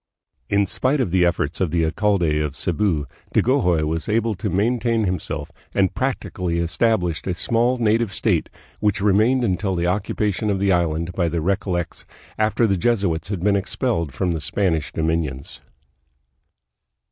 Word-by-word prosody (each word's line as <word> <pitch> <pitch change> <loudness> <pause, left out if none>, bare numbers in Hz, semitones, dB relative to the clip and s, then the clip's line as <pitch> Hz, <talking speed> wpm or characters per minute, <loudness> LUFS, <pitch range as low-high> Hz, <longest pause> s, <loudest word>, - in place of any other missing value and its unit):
In 100 0 +3
spite 130 +9 0
of 120 -10 0
the 90 0 +3
efforts 85 -2 0
of 90 - +2
the 85 0 +1
alcalde 85 -2 +1
of 75 -3 -2
Cebu, 85 -4 0 0.3
Dagohoy 90 - +3
was 80 +4 -2
able 115 +1 +1
to 100 +2 -3
maintain 115 +4 +1
him 90 -3 0
self, 75 -1 -6 0.2
and 95 -1 +2
practically 95 -9 -2
established 90 0 0
a 90 - -1
small 120 +7 +1
native 115 -2 +1
state, - - 0 0.3
which 105 -1 +1
remained 110 +6 +3
until 95 -2 0
the 85 0 0
occupation 105 +2 -1
of 100 - +1
the 100 0 +2
island 85 -1 0
by 85 -2 0
the 85 - -2
Recol 95 +3 0
lects, 85 -1 -4 0.3
after 110 +2 +2
the 100 -3 +1
Jesuits 95 -6 0
had 100 -4 -3
been 100 +2 +3
expelled 100 - -1
from 90 +5 -1
the 80 -2 -2
Span 95 -4 +1
ish 80 -2 -3
dominions. 80 -5 -2
95 Hz, 165 wpm, -22 LUFS, 85-105 Hz, 0.3 s, In